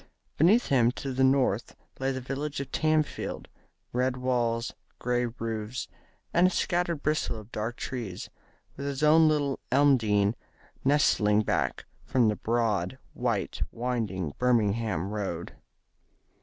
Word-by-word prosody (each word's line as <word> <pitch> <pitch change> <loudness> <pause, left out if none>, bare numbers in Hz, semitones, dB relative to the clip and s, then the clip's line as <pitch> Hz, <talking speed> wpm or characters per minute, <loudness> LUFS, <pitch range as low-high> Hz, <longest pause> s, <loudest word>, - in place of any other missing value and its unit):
Beneath 205 +10 +4
him 120 -4 +4
to 135 0 -5
the 130 +1 +2
north 130 -5 +2 0.2
lay 135 +1 0
the 130 - -3
village 140 +3 -4
of 140 - -5
Tamfield, 155 -1 0 0.5
red 125 +1 +1
walls, 120 -2 0 0.2
grey 125 0 0
roofs, 115 0 -4 0.5
and 175 +2 +5
a - - +2
scattered 175 -4 -1
bristle 155 -6 0
of 110 +2 -14
dark 110 +3 -3
trees, 120 -9 -5 0.5
with 140 +1 -5
his 140 +1 -3
own 160 +1 +6
little 145 -3 +1
Elmdene 115 -7 +4 0.5
nestling 110 -7 +3
back 85 -11 -1 0.2
from 120 -4 +2
the 105 - 0
broad, 110 -2 0 0.2
white 115 -6 -2
winding 110 -10 -2
Birmingham 110 -6 +1
Road. 95 -5 -4
125 Hz, 130 wpm, -28 LUFS, 110-140 Hz, 0.5 s, own